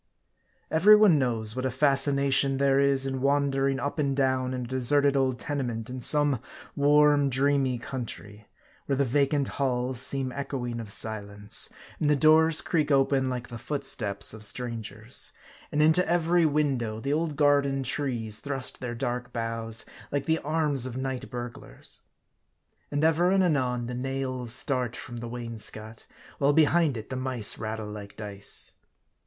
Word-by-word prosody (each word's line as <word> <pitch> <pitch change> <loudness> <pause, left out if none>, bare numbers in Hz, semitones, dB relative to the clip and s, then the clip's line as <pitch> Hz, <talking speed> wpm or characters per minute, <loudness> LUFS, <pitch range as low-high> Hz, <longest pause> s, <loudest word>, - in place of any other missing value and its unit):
EVERY 185 +7 +7
one 205 -8 +5
knows 115 -4 +1
what 130 - -3
a 130 - 0
fascination 140 0 +2
there 135 0 +2
is 140 -1 +2
in 135 -1 -3
wander 140 0 +1
ing 135 -1 -2
up 140 +4 -4
and 140 -2 0
down 130 -1 0
in 130 -1 -4
a - - -9
deserted 140 +3 +2
old 130 -2 +1
tenement 125 -5 -4
in 130 0 -6
some 145 +1 +6 0.3
warm, 145 0 +4
dreamy 135 -1 +1
country; 110 -4 -6 0.4
where 140 - +1
the 140 +1 +1
vacant 140 +2 +1
halls 125 -2 -1
seem 135 -1 +2
echoing 125 -3 -4
of 110 -3 -6
silence, 105 -1 0 0.3
and 150 - +1
the 150 - +4
doors 155 +2 +5
creak 155 -3 0
open 135 -1 +2
like 125 -1 -5
the 115 - -8
footsteps 115 -10 0
of 110 -1 -9
stran 115 +2 -3
gers; 110 +3 0 0.4
and 150 +1 +2
into 160 +4 +5
every 170 0 +2
window 135 -7 -1
the 140 +5 -2
old 155 -1 -1
garden 140 -2 +2
trees 115 -6 -3
thrust 135 -3 -3
their 120 -2 -5
dark 125 0 -4
boughs, 115 -1 -3 0.3
like 140 -1 -2
the 160 0 +1
arms 150 -4 -1
of 125 0 -7
night 130 -1 -4
burglars; 120 -1 -7 0.9
and 145 +1 -2
ever 165 +2 +3
and 190 0 +3
anon 130 -7 0
the 125 - -5
nails 130 -1 -4
start 125 -2 0
from 120 -1 -8
the 120 0 -6
wainscot; 115 -2 -6 0.3
while 140 +1 +3
behind 155 -2 +3
it 110 +4 -9
the - - -3
mice 130 -4 -1
rattle 110 0 -4
like 105 -1 -9
dice. 100 -2 -4
135 Hz, 160 wpm, -27 LUFS, 120-145 Hz, 0.9 s, EVERY